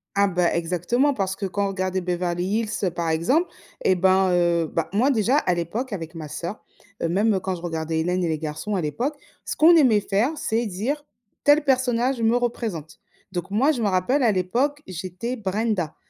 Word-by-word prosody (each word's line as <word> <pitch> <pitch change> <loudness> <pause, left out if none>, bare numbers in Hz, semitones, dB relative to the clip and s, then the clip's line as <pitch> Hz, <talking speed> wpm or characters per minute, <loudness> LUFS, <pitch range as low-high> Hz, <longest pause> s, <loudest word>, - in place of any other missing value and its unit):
Ah, 200 0 +4
bah, 175 -2 +1
exactement 180 - +1
parce 195 -3 -2
que 200 - -3
quand 200 +2 -1
on - - -1
regardait 185 -1 -2
Beverly 175 0 -1
Hills, 215 +3 -1
heu, 180 - +1
par 170 -1 -2
exemple 255 - +2 0.4
et 185 - +4
ben, 190 +1 +3
heu, 170 -2 +2
bah, 165 - -2
moi 240 +8 +2
déjà 245 +2 +2
à 180 -11 +2
l'époque 205 +8 -3
avec 165 -2 -6
ma 155 -2 -6
sœur, 175 +7 -6 0.4
heu, 165 - +1
même, 205 +5 +2
heu, 190 - +1
quand 185 0 -3
je 170 - -10
regardais 160 -1 -2
Hélène 180 +3 0
et - - 0
les 160 -1 0
Garçons 160 +7 -4
à 180 - 0
l'époque, 245 - -2 0.3
ce - - -3
qu'on 330 +3 +7
aimait 230 -9 +5
faire, 210 +9 +1
c'est 230 -4 -1
dire: 245 +10 -3 0.4
«Tel 290 +1 +5
personnage 255 -2 +1
me 225 +2 +3
représente». 220 -10 -3 0.3
Donc 180 +1 -5
moi, 265 +9 +3
je 245 -6 -3
me 210 - +2
rappelle 195 +10 +1
à 220 -3 +4
l'époque, 250 +11 0
j'étais 185 +7 -5
Brenda 200 -5 -1
195 Hz, 205 wpm, -23 LUFS, 175-240 Hz, 0.4 s, qu'on